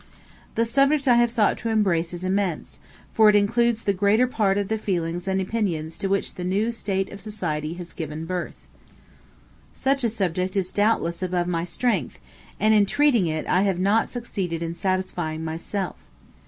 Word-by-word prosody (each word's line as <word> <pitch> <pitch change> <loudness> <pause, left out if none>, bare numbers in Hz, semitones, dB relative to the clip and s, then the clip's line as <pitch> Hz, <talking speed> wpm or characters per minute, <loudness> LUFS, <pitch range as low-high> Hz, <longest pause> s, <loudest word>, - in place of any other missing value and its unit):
The 230 - +2
subject 275 +4 +2
I 245 - +7
have 240 0 +4
sought 225 -3 +2
to 230 - -3
embrace 185 -7 +1
is 175 0 -6
immense, 185 -2 -2 0.3
for 220 -1 +6
it 210 - +4
includes 230 +3 +2
the 200 - +2
greater 205 +5 +3
part 210 -6 +1
of 200 -1 -1
the 220 +1 -1
feelings 175 -3 -2
and 190 0 +1
opinions 185 -6 -2
to 195 - -1
which 195 0 0
the 180 - -6
new 200 +6 0
state 195 -4 -2
of 200 - -9
society 165 -7 -3
has 175 -1 -9
given 155 0 -5
birth. 180 0 -5 1.1
Such 270 0 0
a 235 - +3
subject 185 -3 -1
is 185 -1 -1
doubtless 205 -5 +1
above 180 -1 0
my 170 -1 -1
strength, 185 - -1 0.4
and 215 +2 +4
in 205 -2 +4
treating 250 -8 +3
it 155 0 -2
I 185 - +2
have 195 -2 +1
not 200 +5 +2
succeeded 190 -9 -4
in 165 0 -3
satisfying 175 -3 -2
myself. 170 +4 -4
195 Hz, 180 wpm, -24 LUFS, 175-220 Hz, 1.1 s, I